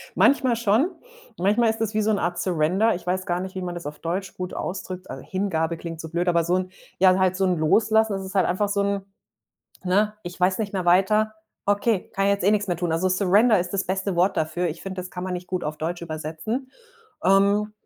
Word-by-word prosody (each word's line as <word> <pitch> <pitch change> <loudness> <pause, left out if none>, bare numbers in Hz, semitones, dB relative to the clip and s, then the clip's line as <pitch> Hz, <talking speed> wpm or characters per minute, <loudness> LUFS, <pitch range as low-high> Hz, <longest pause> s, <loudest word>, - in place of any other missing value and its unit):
Manchmal 260 -3 +4
schon. 235 - +3 0.5
Manchmal 215 +5 +3
ist 220 0 -2
das 220 -1 -1
wie 215 - +1
so 220 - +2
'n 205 - +1
Art 175 +1 -1
Surrender. 180 +5 +2
Ich 175 0 -9
weiß 185 +1 -1
gar 175 0 -1
nicht, 190 +1 -6
wie 185 - -3
man 175 -1 -4
das 170 -3 -7
auf 150 0 -6
Deutsch 180 +3 -3
gut 180 0 -5
ausdrückt. 185 0 -5
Äh, - - -7
Hingabe 170 -4 -1
klingt 165 -1 -7
so 160 - -8
blöd, 175 +2 -1
aber 170 -1 +3
so 175 +2 +1
'n 185 0 -3 0.3
ja, 185 0 +6
halt 185 -1 +2
so 190 - +2
'n 180 -2 +1
Loslassen, 220 +6 +3
das 195 0 -4
ist 190 +2 -9
halt 190 - +4
einfach 200 +3 0
so 200 0 +1
'n 200 -1 -1 0.8
ne: 205 +4 +2
„Ich 175 +1 -8
weiß 185 +1 +2
nicht 210 -3 -3
mehr 185 -2 -1
weiter. 210 +5 +3 0.3
Okay, 205 0 +1
kann 195 0 +1
jetzt, 200 -1 +1
eh, 200 - +5
nix 210 -1 +1
mehr 175 -2 -1
tun.“ 170 -2 -1
Also, 175 +3 +1
Surrender 200 +4 +4
ist 175 +1 -3
das 195 -1 0
beste 190 +1 -2
Wort 180 +3 +2
dafür. 165 +3 -1
Ich 165 +1 -6
finde, 190 -1 -5
das 180 - -8
kann 180 0 -6
man 185 - -3
nicht 180 0 -5
gut 185 -1 -3
auf 150 0 -4
Deutsch 170 +2 -3
übersetzen. 165 - -4 0.5
Ähm, 200 +2 +3
185 Hz, 240 wpm, -24 LUFS, 175-205 Hz, 0.8 s, ja